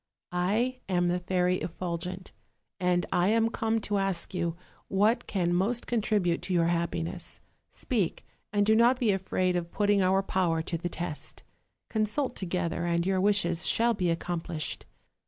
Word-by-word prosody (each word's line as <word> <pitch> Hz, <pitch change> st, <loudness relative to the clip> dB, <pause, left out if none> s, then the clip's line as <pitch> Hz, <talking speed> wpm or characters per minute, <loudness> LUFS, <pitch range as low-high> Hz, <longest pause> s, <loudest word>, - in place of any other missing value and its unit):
I 215 Hz, +9 st, 0 dB
am 175 Hz, -1 st, +2 dB
the 180 Hz, +1 st, +1 dB
Fairy 180 Hz, 0 st, +1 dB
Effulgent, 180 Hz, +2 st, -4 dB, 0.5 s
and 180 Hz, -1 st, +2 dB
I 175 Hz, +1 st, +3 dB
am 225 Hz, +1 st, +3 dB
come 225 Hz, -1 st, 0 dB
to 205 Hz, -1 st, -1 dB
ask 195 Hz, -2 st, -1 dB
you 170 Hz, -2 st, -1 dB, 0.3 s
what 210 Hz, +5 st, +2 dB
can 175 Hz, -3 st, 0 dB
most 215 Hz, +7 st, +1 dB
contribute 205 Hz, -7 st, +1 dB
to 185 Hz, -, -2 dB
your 170 Hz, -1 st, +3 dB
happiness: 170 Hz, 0 st, -2 dB, 0.3 s
speak, 210 Hz, -, -2 dB, 0.3 s
and 205 Hz, -1 st, +2 dB
do 220 Hz, -, +4 dB
not 240 Hz, +3 st, +5 dB
be 240 Hz, -5 st, +2 dB
afraid 185 Hz, -1 st, 0 dB
of 170 Hz, -1 st, -2 dB
putting 205 Hz, -1 st, +2 dB
our 190 Hz, +1 st, +3 dB
power 170 Hz, -4 st, +1 dB
to 170 Hz, -, -3 dB
the 175 Hz, -, -3 dB
test; 170 Hz, -3 st, -5 dB, 0.4 s
consult 225 Hz, +5 st, -1 dB
together, 180 Hz, -2 st, -2 dB
and 170 Hz, 0 st, +1 dB
your 190 Hz, -1 st, +1 dB
wishes 175 Hz, -5 st, +2 dB
shall 235 Hz, +1 st, +3 dB
be 185 Hz, -5 st, 0 dB
accomplished. 165 Hz, -2 st, -3 dB
185 Hz, 155 wpm, -29 LUFS, 175-210 Hz, 0.5 s, not